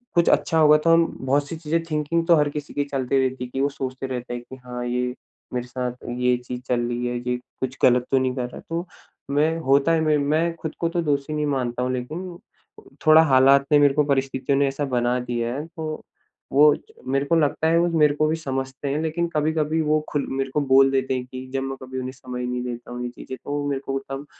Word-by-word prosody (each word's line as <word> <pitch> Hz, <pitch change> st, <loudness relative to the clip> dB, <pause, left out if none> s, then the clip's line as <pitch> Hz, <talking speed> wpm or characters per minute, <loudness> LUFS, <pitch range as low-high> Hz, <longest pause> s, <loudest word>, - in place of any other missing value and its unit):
कुछ 170 Hz, -1 st, +4 dB
अच्छा 165 Hz, -, +2 dB
होगा 150 Hz, -1 st, +7 dB
तो 165 Hz, +2 st, +3 dB
हम 165 Hz, 0 st, +5 dB, 0.2 s
बहुत 140 Hz, +2 st, +1 dB
सी -, -, -4 dB
चीज़े 160 Hz, +1 st, 0 dB
थिंकिंग 155 Hz, +2 st, 0 dB
तो 170 Hz, -, +7 dB
हर 150 Hz, -1 st, +2 dB
किसी 145 Hz, 0 st, -6 dB
की 145 Hz, -, 0 dB
चलती 135 Hz, -1 st, 0 dB
रहती 130 Hz, 0 st, -6 dB
है -, -, -10 dB
कि 135 Hz, -, -1 dB
वो 140 Hz, -, +2 dB
सोचते 135 Hz, -1 st, -5 dB
रहते 125 Hz, -1 st, -5 dB
हैं 120 Hz, 0 st, -5 dB
कि 130 Hz, -, -8 dB
हाँ, 125 Hz, 0 st, -5 dB
ये 125 Hz, 0 st, -1 dB, 0.4 s
मेरे 125 Hz, 0 st, -3 dB
साथ 125 Hz, 0 st, -3 dB, 0.3 s
ये 125 Hz, 0 st, +3 dB
चीज़ 125 Hz, 0 st, -7 dB
चल 125 Hz, -1 st, +1 dB
रही 120 Hz, 0 st, -2 dB
है, 120 Hz, 0 st, -2 dB
ये 125 Hz, -, 0 dB, 0.2 s
कुछ 130 Hz, 0 st, -3 dB
ग़लत 125 Hz, 0 st, +5 dB
तो 135 Hz, -, +4 dB
नहीं 130 Hz, -1 st, 0 dB
कर 125 Hz, -2 st, -3 dB
रहा? -, -, -10 dB
तो 170 Hz, +2 st, -3 dB, 0.4 s
मैं 155 Hz, +3 st, +2 dB
होता 140 Hz, +4 st, +4 dB
है 165 Hz, -1 st, +3 dB
मैं 155 Hz, -1 st, +3 dB
मैं 155 Hz, +4 st, +1 dB
ख़ुद 160 Hz, -, -5 dB
को 170 Hz, -, 0 dB
तो 170 Hz, +1 st, -1 dB
दोषी 145 Hz, -1 st, -1 dB
नहीं 150 Hz, 0 st, 0 dB
मानता 125 Hz, -4 st, -1 dB
हूँ 125 Hz, -, 0 dB
लेकिन 165 Hz, +8 st, -5 dB, 0.7 s
थोड़ा 155 Hz, +1 st, +9 dB
हालात 135 Hz, -1 st, +5 dB
ने 150 Hz, -, +7 dB
मेरे 145 Hz, -1 st, +5 dB
को 150 Hz, +1 st, +3 dB
परिस्थितियों 135 Hz, 0 st, 0 dB
ने 140 Hz, -, +3 dB
ऐसा 135 Hz, +2 st, -2 dB
बना 125 Hz, 0 st, +1 dB
दिया 120 Hz, -1 st, -2 dB
है। 145 Hz, +3 st, -4 dB
तो 160 Hz, -2 st, -6 dB, 0.5 s
वो 150 Hz, +2 st, +7 dB, 0.4 s
मेरे 140 Hz, +1 st, +1 dB
को 165 Hz, -, +2 dB
लगता 160 Hz, 0 st, +2 dB
है 165 Hz, +1 st, +4 dB
वो 170 Hz, -, +3 dB
मेरे 150 Hz, -1 st, +5 dB
को 155 Hz, +1 st, +2 dB
भी 155 Hz, -, +1 dB
समझते 135 Hz, -2 st, -4 dB
हैं। 145 Hz, +3 st, -1 dB
लेकिन 160 Hz, +2 st, -1 dB
कभी-कभी 155 Hz, +1 st, +1 dB
वो 155 Hz, 0 st, +2 dB
ख़ुल 145 Hz, -, 0 dB
मेरे 135 Hz, 0 st, -2 dB
को 150 Hz, -, +2 dB
बोल 135 Hz, +1 st, +6 dB
देते 135 Hz, -1 st, 0 dB
हैं 125 Hz, -1 st, -3 dB
कि 130 Hz, 0 st, -8 dB
जब 135 Hz, 0 st, -1 dB
मैं 135 Hz, 0 st, -4 dB
कभी 130 Hz, 0 st, -7 dB
उन्हें 130 Hz, 0 st, -4 dB
समय 125 Hz, -2 st, -6 dB
नहीं 125 Hz, 0 st, -2 dB
देता 120 Hz, -1 st, -6 dB
हूँ 125 Hz, 0 st, -5 dB
ये 120 Hz, -, -3 dB
चीज़े। 125 Hz, +1 st, -8 dB
तो 145 Hz, -, -8 dB
वो 145 Hz, 0 st, -1 dB
मेरे 140 Hz, -1 st, -2 dB
को 135 Hz, -, -1 dB
तब 135 Hz, +1 st, -5 dB
135 Hz, 245 wpm, -23 LUFS, 125-150 Hz, 0.7 s, थोड़ा